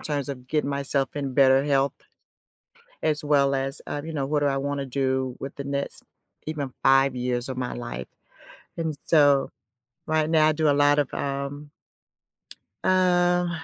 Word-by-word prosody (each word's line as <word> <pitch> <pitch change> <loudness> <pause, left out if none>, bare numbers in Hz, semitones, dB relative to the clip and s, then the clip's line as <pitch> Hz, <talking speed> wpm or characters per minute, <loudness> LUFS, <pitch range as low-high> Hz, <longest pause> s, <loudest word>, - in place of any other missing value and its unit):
terms 145 -2 -3
of 130 -3 -7
getting 150 -1 0
myself 140 -1 -1
in 140 -3 -3
better 135 0 +5
health, 140 -1 +2 1.1
as 150 0 0
well 140 -2 +3
as, 135 +1 -2
uh, 145 - -4
you 160 +1 -6
know, 140 -3 -1
what 145 +2 0
do 145 - 0
I 135 -1 0
wanna 140 0 -2
do 130 -1 -1
with 135 - -7
the 140 - -5
next, 140 0 -4 0.4
even, 145 -4 -4
5 135 0 +4
years 125 0 -2
of 130 - -5
my 125 -1 -3
life. 120 - -6 0.7
And 160 -2 -2
so, 145 -4 +4 0.6
right 155 -1 +1
now 155 -1 +4
I - - +4
do 155 0 +1
a - - +4
lot 145 +1 +4
of, 145 - -1
um, 140 +1 -4 1.1
um, 180 -1 +3
140 Hz, 165 wpm, -25 LUFS, 135-150 Hz, 1.1 s, better